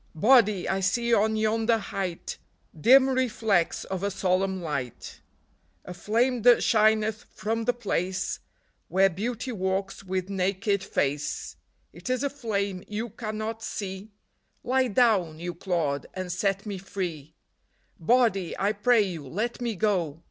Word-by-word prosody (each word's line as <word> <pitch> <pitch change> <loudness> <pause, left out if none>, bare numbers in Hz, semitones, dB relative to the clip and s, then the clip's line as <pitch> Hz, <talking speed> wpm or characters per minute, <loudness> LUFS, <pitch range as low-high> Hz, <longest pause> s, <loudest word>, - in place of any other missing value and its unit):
" - - -36
Body, 215 0 +4
I 190 - 0
see 235 +5 +1
on 220 0 +3
yonder 220 +1 +2
height 195 -4 -5 0.4
Dim 260 - +6
reflex 225 -9 +1
of 190 -1 -4
a 200 - 0
solemn 190 0 0
light; 140 -8 -5 0.7
A 180 - -7
flame 230 +7 0
that 245 +1 +6
shineth 215 0 +2
from 225 +3 -2
the 245 - +2
place 190 -5 -2 0.5
Where 195 +1 +3
Beauty 230 +7 -3
walks 195 -1 -2
with 185 -1 -2
naked 195 +1 0
face 145 +1 -2 0.4
It - - -8
is 255 +2 0
a 280 - 0
flame 200 -8 -2
you 220 +3 -4
cannot 220 0 -5
see; 195 -1 -5 0.3
— - - -45
Lie 260 +1 +2
down, 200 -8 +2
you 175 +2 -5
clod, 165 -5 -2
and 185 -1 -4
set 195 +2 -1
me 200 -3 -4
free. 175 -6 -5 0.3
" - - -42
Body, 200 -2 +2
I 200 +1 +1
pray 215 +2 +3
you, 170 -8 -5
let 220 - -3
me 235 -3 -2
go 175 -7 0
200 Hz, 150 wpm, -27 LUFS, 185-225 Hz, 0.7 s, Dim